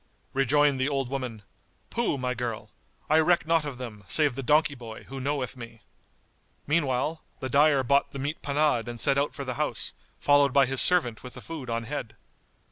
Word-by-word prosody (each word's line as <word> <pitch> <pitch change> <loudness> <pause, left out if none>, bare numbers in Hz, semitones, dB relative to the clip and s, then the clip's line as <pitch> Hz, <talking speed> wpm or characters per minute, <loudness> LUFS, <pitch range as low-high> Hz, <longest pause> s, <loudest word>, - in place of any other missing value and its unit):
Rejoined 140 +1 +2
the 130 - +1
old 135 -3 -2
woman, 125 -6 -5 0.5
"Pooh, 235 -11 0
my 125 -1 -2
girl! 115 -3 -5 0.4
I 155 +1 +4
reck 160 -2 +3
not 165 -1 +2
of 140 -4 -6
them, 115 -5 -8
save 145 - +5
the 135 - -5
donkey 150 +1 +3
boy, 115 -4 -10
who 135 0 -8
knoweth 135 -1 -2
me." 115 -2 -11 0.8
Meanwhile 150 0 0 0.2
the 130 - -4
dyer 140 0 +4
bought 140 +3 +2
the - - -8
meat 145 +3 -4
panade 145 -4 +1
and 120 -1 -6
set 140 +2 +2
out 145 - -1
for 140 - -5
the 125 - -3
house, - - -2 0.3
followed 145 -2 +4
by 140 -1 +5
his 135 0 +3
servant 140 -12 +3
with 125 - -10
the - - -8
food 155 -6 -7
on 115 0 -2
head. 125 -2 -6
135 Hz, 195 wpm, -27 LUFS, 125-145 Hz, 0.8 s, save